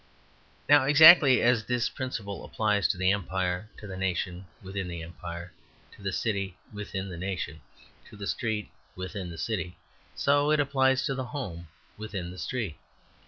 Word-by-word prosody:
Now, 145 Hz, -2 st, +6 dB
exactly 150 Hz, -2 st, +8 dB
as 120 Hz, -3 st, +3 dB
this 125 Hz, -1 st, 0 dB
principle 110 Hz, -7 st, -5 dB
applies 105 Hz, -3 st, +1 dB
to -, -, -1 dB
the 95 Hz, +1 st, +3 dB
empire, 95 Hz, 0 st, -2 dB
to -, -, -10 dB
the 95 Hz, -2 st, -6 dB
nation 95 Hz, 0 st, -2 dB, 0.2 s
within 95 Hz, 0 st, -4 dB
the 85 Hz, -2 st, -5 dB
empire, 85 Hz, +1 st, -8 dB, 0.4 s
to -, -, -17 dB
the 100 Hz, 0 st, -2 dB
city 100 Hz, -2 st, -2 dB, 0.2 s
within 100 Hz, -2 st, -5 dB
the 90 Hz, -, -7 dB
nation, 90 Hz, -5 st, -4 dB, 0.5 s
to -, -, -13 dB
the 100 Hz, -, -6 dB
street 110 Hz, 0 st, -2 dB, 0.2 s
within 95 Hz, 0 st, -5 dB
the 85 Hz, -, -8 dB
city, 90 Hz, -5 st, -3 dB, 0.4 s
so 145 Hz, +1 st, +3 dB
it 155 Hz, 0 st, +3 dB
applies 135 Hz, -2 st, +2 dB
to 135 Hz, -, 0 dB
the 130 Hz, -1 st, -3 dB
home 95 Hz, -, -6 dB, 0.3 s
within 100 Hz, -5 st, -5 dB
the 90 Hz, -, -10 dB
street. 105 Hz, -4 st, -3 dB
100 Hz, 165 wpm, -28 LUFS, 90-125 Hz, 0.5 s, exactly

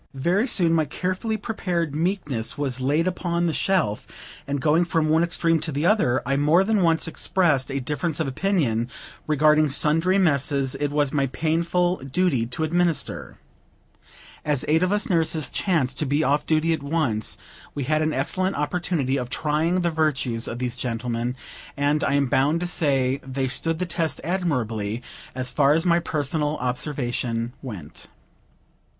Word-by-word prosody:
Very 180 Hz, -, +1 dB
soon 175 Hz, -8 st, +2 dB
my 160 Hz, -2 st, +2 dB
carefully 185 Hz, +8 st, -2 dB
prepared 180 Hz, -7 st, -2 dB
meekness 150 Hz, -, -2 dB
was 135 Hz, -3 st, -2 dB
laid 145 Hz, +6 st, +1 dB
upon 175 Hz, -1 st, -1 dB
the 165 Hz, -, 0 dB
shelf; 165 Hz, -, 0 dB, 0.4 s
and, 140 Hz, 0 st, -1 dB
going 155 Hz, +5 st, +3 dB
from 165 Hz, -2 st, 0 dB
one 160 Hz, +1 st, +4 dB
extreme 165 Hz, -1 st, +2 dB
to 155 Hz, +1 st, -2 dB
the 145 Hz, +3 st, -1 dB
other, 175 Hz, -, +2 dB
I 140 Hz, +2 st, 0 dB
more 155 Hz, +6 st, +4 dB
than 210 Hz, 0 st, +1 dB
once 165 Hz, -2 st, +2 dB
expressed 160 Hz, -5 st, +1 dB
a 140 Hz, 0 st, -2 dB
difference 150 Hz, +4 st, -2 dB
of 160 Hz, -, 0 dB
opinion 135 Hz, -, 0 dB, 0.4 s
regarding 155 Hz, 0 st, +4 dB
sundry 165 Hz, +7 st, +2 dB
messes 140 Hz, -6 st, +1 dB
it 145 Hz, -, -2 dB
was 145 Hz, -1 st, 0 dB
my 140 Hz, -2 st, +1 dB
painful 170 Hz, +5 st, 0 dB
duty 135 Hz, -3 st, 0 dB
to 125 Hz, +6 st, -3 dB
administer. 170 Hz, -2 st, -1 dB, 1.1 s
As 145 Hz, -4 st, +1 dB
eight 160 Hz, +2 st, +3 dB
of 185 Hz, +1 st, +1 dB
us 205 Hz, 0 st, +1 dB
nurses 160 Hz, -5 st, +1 dB
chanced 140 Hz, -9 st, 0 dB
to 150 Hz, -, 0 dB
be 145 Hz, +3 st, +1 dB
off 145 Hz, +1 st, +1 dB
duty 160 Hz, +1 st, +2 dB
at 160 Hz, -, -3 dB
once, 140 Hz, -8 st, -1 dB, 0.4 s
we 145 Hz, -, -2 dB
had 155 Hz, +3 st, +1 dB
an 155 Hz, 0 st, +1 dB
excellent 185 Hz, +8 st, 0 dB
opportunity 150 Hz, -3 st, -1 dB
of 125 Hz, -2 st, -4 dB
trying 160 Hz, +6 st, 0 dB
the 170 Hz, -1 st, 0 dB
virtues 140 Hz, -7 st, 0 dB
of 120 Hz, -, -4 dB
these 125 Hz, -1 st, -2 dB
gentlemen; 120 Hz, 0 st, -2 dB, 0.4 s
and 145 Hz, +2 st, +1 dB
I 140 Hz, -, +1 dB
am 140 Hz, 0 st, +3 dB
bound 140 Hz, +5 st, +2 dB
to -, -, -1 dB
say 135 Hz, -6 st, 0 dB
they 130 Hz, 0 st, -2 dB
stood 160 Hz, +5 st, 0 dB
the 180 Hz, -, -2 dB
test 170 Hz, -2 st, -2 dB
admirably, 125 Hz, -, -2 dB, 0.3 s
as 130 Hz, -1 st, -2 dB
far 145 Hz, -1 st, +4 dB
as 165 Hz, +3 st, +1 dB
my 170 Hz, -1 st, +4 dB
personal 150 Hz, -1 st, -2 dB
observation 125 Hz, -2 st, -2 dB
went. 100 Hz, -, -8 dB
150 Hz, 165 wpm, -24 LUFS, 135-170 Hz, 1.1 s, one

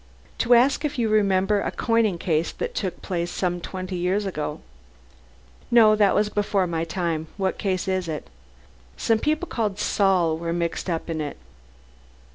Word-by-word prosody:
"To 240 Hz, +1 st, +5 dB
ask 270 Hz, +5 st, +3 dB
if 295 Hz, -1 st, -2 dB
you 230 Hz, -2 st, +1 dB
remember 200 Hz, -1 st, +2 dB
a -, -, -1 dB
coining 225 Hz, -5 st, +1 dB
case 165 Hz, -2 st, 0 dB
that -, -, -4 dB
took 190 Hz, -3 st, -4 dB
place 175 Hz, -2 st, -2 dB
some 175 Hz, -1 st, -2 dB
twenty 185 Hz, +1 st, -5 dB
years 185 Hz, +4 st, 0 dB
ago?" 150 Hz, -4 st, -4 dB, 1.1 s
"No. 225 Hz, -3 st, +6 dB
That 205 Hz, -2 st, +3 dB
was 210 Hz, 0 st, +3 dB
before 205 Hz, -2 st, 0 dB
my 165 Hz, -2 st, -2 dB
time. 165 Hz, -2 st, -2 dB
What 190 Hz, -2 st, -1 dB
case 190 Hz, -1 st, -1 dB
is 185 Hz, -2 st, -1 dB
it?" 155 Hz, -2 st, -5 dB, 0.7 s
"Some 225 Hz, -1 st, +2 dB
people 310 Hz, +7 st, 0 dB
called 210 Hz, -4 st, -2 dB
Saul 185 Hz, -6 st, +2 dB
were 170 Hz, 0 st, -2 dB
mixed 170 Hz, +2 st, -2 dB
up 165 Hz, -2 st, -2 dB
in 160 Hz, -2 st, -2 dB
it." 145 Hz, -1 st, -5 dB
190 Hz, 165 wpm, -24 LUFS, 170-215 Hz, 1.1 s, No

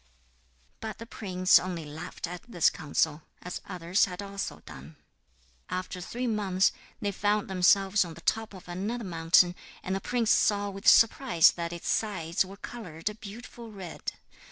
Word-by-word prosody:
But 220 Hz, -2 st, -6 dB
the 230 Hz, -, -8 dB
prince 185 Hz, -5 st, +3 dB
only 175 Hz, -3 st, -5 dB
laughed 150 Hz, +2 st, -6 dB
at 175 Hz, +1 st, -7 dB
this 175 Hz, -8 st, +3 dB
counsel 155 Hz, -1 st, 0 dB, 0.2 s
as 180 Hz, -, -5 dB
others 180 Hz, +1 st, +1 dB
had 180 Hz, -3 st, -8 dB
also 200 Hz, -1 st, -5 dB
done. 70 Hz, +4 st, -11 dB, 0.7 s
After 185 Hz, 0 st, -4 dB
three 245 Hz, +7 st, -4 dB
months 200 Hz, -5 st, +2 dB, 0.3 s
they 205 Hz, -3 st, -1 dB
found 205 Hz, +2 st, 0 dB
themselves 195 Hz, +2 st, +4 dB
on 165 Hz, -2 st, -8 dB
the 170 Hz, -, -12 dB
top 220 Hz, +2 st, -1 dB
of 185 Hz, -, -13 dB
another 205 Hz, +7 st, -3 dB
mountain, 175 Hz, 0 st, +4 dB, 0.3 s
and 190 Hz, -, -2 dB
the 195 Hz, -, -3 dB
prince 235 Hz, -1 st, +1 dB
saw 205 Hz, -1 st, +3 dB
with 195 Hz, +3 st, -7 dB
surprise 230 Hz, -7 st, +6 dB
that 170 Hz, -1 st, -4 dB
its 170 Hz, 0 st, -7 dB
sides 185 Hz, -6 st, 0 dB
were 195 Hz, +1 st, -11 dB
coloured 195 Hz, -7 st, -6 dB
a -, -, -6 dB
beautiful 225 Hz, +2 st, -10 dB
red. 190 Hz, -5 st, -6 dB
190 Hz, 160 wpm, -29 LUFS, 175-210 Hz, 0.7 s, surprise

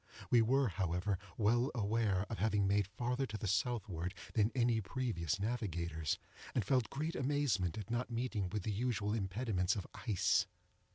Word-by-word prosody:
We 120 Hz, -, +7 dB
were, 135 Hz, +4 st, +3 dB
however, 90 Hz, 0 st, -1 dB, 0.2 s
well 120 Hz, +4 st, +3 dB
aware 105 Hz, -3 st, +1 dB
of 110 Hz, -, -5 dB
having 105 Hz, -2 st, +2 dB
made 100 Hz, 0 st, +2 dB
farther 125 Hz, +5 st, -1 dB
to 110 Hz, -1 st, -4 dB
the 105 Hz, -, -5 dB
southward 95 Hz, -3 st, -1 dB, 0.2 s
than 110 Hz, 0 st, +3 dB
any 120 Hz, -3 st, +3 dB
previous 95 Hz, -, -1 dB
navigators, 85 Hz, -, -1 dB, 0.4 s
and 115 Hz, -, +1 dB
felt 125 Hz, 0 st, +2 dB
great 155 Hz, +4 st, -2 dB
amazement 130 Hz, -, +1 dB
at 105 Hz, 0 st, -5 dB
not 120 Hz, +1 st, -1 dB
meeting 115 Hz, -5 st, -1 dB
with 105 Hz, +1 st, -3 dB
the 105 Hz, -, -1 dB
usual 110 Hz, -2 st, 0 dB
impediments 100 Hz, -2 st, 0 dB
of 100 Hz, -, -4 dB
ice. 105 Hz, -6 st, +2 dB
110 Hz, 160 wpm, -36 LUFS, 95-120 Hz, 0.4 s, We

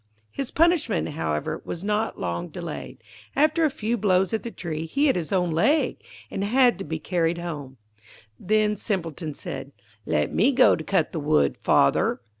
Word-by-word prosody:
His 270 Hz, -2 st, -3 dB
punishment, 315 Hz, -, +2 dB
however, 75 Hz, -, -2 dB
was 170 Hz, -, -6 dB
not 210 Hz, +2 st, -1 dB
long 85 Hz, -1 st, -3 dB
delayed. -, -, -7 dB, 0.3 s
After 310 Hz, +3 st, +3 dB
a -, -, +3 dB
few 235 Hz, -2 st, -2 dB
blows 190 Hz, -2 st, +2 dB
at 220 Hz, -, 0 dB
the 235 Hz, -, -5 dB
tree, 165 Hz, -6 st, -5 dB
he 280 Hz, -, +1 dB
hit 275 Hz, -, +3 dB
his 170 Hz, -3 st, -3 dB
own 180 Hz, -3 st, +1 dB
leg, 280 Hz, -, +2 dB, 0.3 s
and 195 Hz, -, -2 dB
had 245 Hz, +2 st, +3 dB
to -, -, -3 dB
be 160 Hz, -1 st, -4 dB
carried 170 Hz, 0 st, 0 dB
home. 145 Hz, -6 st, -6 dB, 0.6 s
Then 215 Hz, +1 st, +2 dB
Simpleton 165 Hz, -, -3 dB
said, 140 Hz, -, -7 dB, 0.3 s
'Let 75 Hz, -2 st, 0 dB
me -, -, +3 dB
go -, -, +6 dB
to -, -, -6 dB
cut -, -, +1 dB
the -, -, -3 dB
wood, 70 Hz, -1 st, +2 dB
father.' 70 Hz, -, +2 dB
185 Hz, 175 wpm, -25 LUFS, 160-230 Hz, 0.6 s, go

